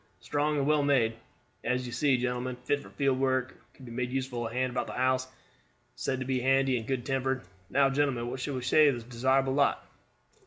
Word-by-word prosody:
Strong 150 +1 0
and 140 - +1
well 150 0 +3
made, 130 -6 +3 0.5
as 125 0 0
you 120 - -6
see, 130 +2 +2
gentlemen; 125 0 -2
fit 145 +3 +1
for - - -13
field 135 -2 0
work, 130 -1 +1
or - - -22
could 130 - -13
be 120 - -9
made 125 +1 -2
a - - -8
useful 130 -3 -2
hand 125 +2 -1
about 125 - -2
a - - -5
house; 130 0 +1 0.7
said 130 - -2
to - - -2
be 130 0 0
handy 135 +1 +3
and 110 - -9
good 130 -3 -2
tempered. 130 -2 -1 0.3
Now, 140 0 +4
gentlemen, 135 -4 0
what 130 +2 -4
shall 140 +1 -3
we 130 - -4
say 150 +4 +5
for - - +2
this 120 - -7
desirable 130 +3 +1
lot?" 140 0 +2
130 Hz, 225 wpm, -29 LUFS, 125-135 Hz, 0.7 s, say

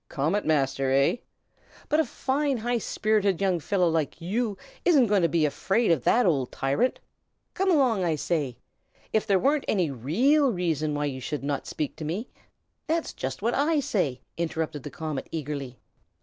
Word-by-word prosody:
Comet 160 +9 0
Master, 135 -3 +1
eh? 140 - +3 0.7
But 305 - +2
a 320 - +3
fine 275 0 -1
high 240 +1 -1
spirited 210 -4 +1
young 190 -3 +1
fellow 180 +3 +1
like 160 -2 -1
you 205 +4 -1 0.3
isn't 295 -8 +5
going 205 -3 +2
to 170 - +4
be 165 -2 +2
afraid 195 +8 +1
of 150 -7 +2
that 245 - +4
old 140 -8 +1
tyrant. 140 - 0 0.5
Come 385 +1 0
along, 255 - +3
I 165 -3 +1
say! 145 -5 -2 0.6
If 215 - +1
there 195 - +4
were 280 +9 +2
any 180 -8 +1
real 250 - +2
reason 160 -6 -1
why 145 0 -1
you 130 -2 -4
should 150 +2 -4
not 140 0 -2
speak 150 - -3
to - - -6
me 180 +10 -3 0.3
" - - -50
"That's 325 +1 -1
just 130 +8 -5
what 235 +2 +1
I 300 +2 +2
say," 190 - -1 0.2
interrupted 160 -3 -2
the 150 - -7
comet, 155 -3 -5
eagerly. 140 -5 -5
175 Hz, 180 wpm, -26 LUFS, 145-235 Hz, 0.7 s, isn't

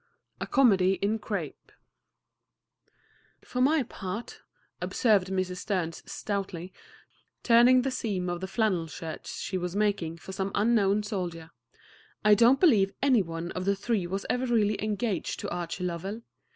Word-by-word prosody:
A - - -4
COMEDY 195 -8 +4
IN 205 +3 -1
CRAPE - - -5 1.7
"For 250 - -3
my 290 +2 +4
part," 215 -1 -7 0.4
observed 205 -6 +2
Mrs. 185 -1 -2
Sterns 180 -5 -2
stoutly, 190 -3 -4 0.7
turning 245 +2 +6
the 270 - -1
seam 200 -7 -2
of 175 0 -3
the 190 - -3
flannel 190 -5 0
shirt 160 0 -7
she 185 - -4
was 180 +1 -4
making 200 -6 0
for 180 - -10
some 190 0 -2
unknown 210 -2 +3
soldier, 175 -6 -5 0.7
"I 210 - +7
don't 235 +5 +5
believe 210 - +4
any 260 -6 +5
one 165 -1 -5
of 185 0 -4
the 200 0 +2
three 200 -2 -1
was 195 +2 -4
ever 255 +1 0
really 215 -3 +1
engaged 210 -3 -2
to - - -4
Archie 175 +1 -4
Lovell. 190 +6 -4
200 Hz, 145 wpm, -28 LUFS, 180-225 Hz, 1.7 s, I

